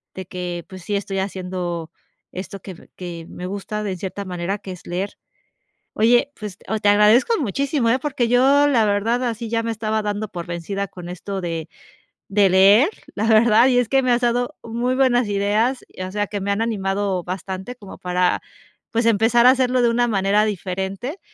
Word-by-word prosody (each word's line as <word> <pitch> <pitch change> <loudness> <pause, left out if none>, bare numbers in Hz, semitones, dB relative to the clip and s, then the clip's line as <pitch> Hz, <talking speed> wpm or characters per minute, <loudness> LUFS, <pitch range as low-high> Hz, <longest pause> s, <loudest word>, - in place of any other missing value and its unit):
de 190 - -6
que, 175 -1 -5
pues, 185 -2 -11
sí 205 +1 -2
estoy 195 -1 -2
haciendo 180 -3 -4 0.4
esto 195 +2 -7
que 185 -4 -11
que 170 -2 -7
me 180 - -7
gusta 205 +2 -4
de 195 -3 -2
cierta 195 +2 -5
manera, 180 +2 -3
que 190 - -9
es 180 - -11
leer. 185 +3 -3 0.8
Oye, 240 +5 +3
pues 210 -2 -7
o 220 - -1
te 205 - +3
agradezco 210 - +5
muchísimo, 270 +1 0
¿eh?, 255 - +3
porque 265 -4 -1
yo 270 +4 +4
la 235 -6 +3
verdad 220 +5 +1
así 230 -1 -3
ya 230 0 0
me 230 - -1
estaba 220 0 -1
dando 210 +1 -2
por 175 -3 -6
vencida 190 +4 -4
con 175 -1 -10
esto 190 +2 -5
de 165 -2 -4 0.6
de 200 0 +4
leer, 200 - +6 0.3
la 215 - -1
verdad, 225 +1 +6
y 250 -1 +3
es 245 -3 +1
que 270 0 +3
me 255 - +1
has 240 +1 +2
dado 245 +1 0
muy 240 +3 -1
buenas 250 -4 +3
ideas, 210 +6 +1
y - - -9
o 185 - -4
sea, 205 +1 -1
que 205 0 -4
me 200 +1 -2
han 200 +3 +1
animado 195 -4 -1
bastante 190 +6 -6
como 205 -5 -11
para, 180 0 +1 0.5
pues, 230 0 0
empezar 230 +2 +4
a - - +10
hacerlo 255 -1 +2
de 235 - +4
una 240 +1 +2
manera 200 0 +2
diferente 195 - -4
205 Hz, 195 wpm, -21 LUFS, 190-235 Hz, 0.8 s, a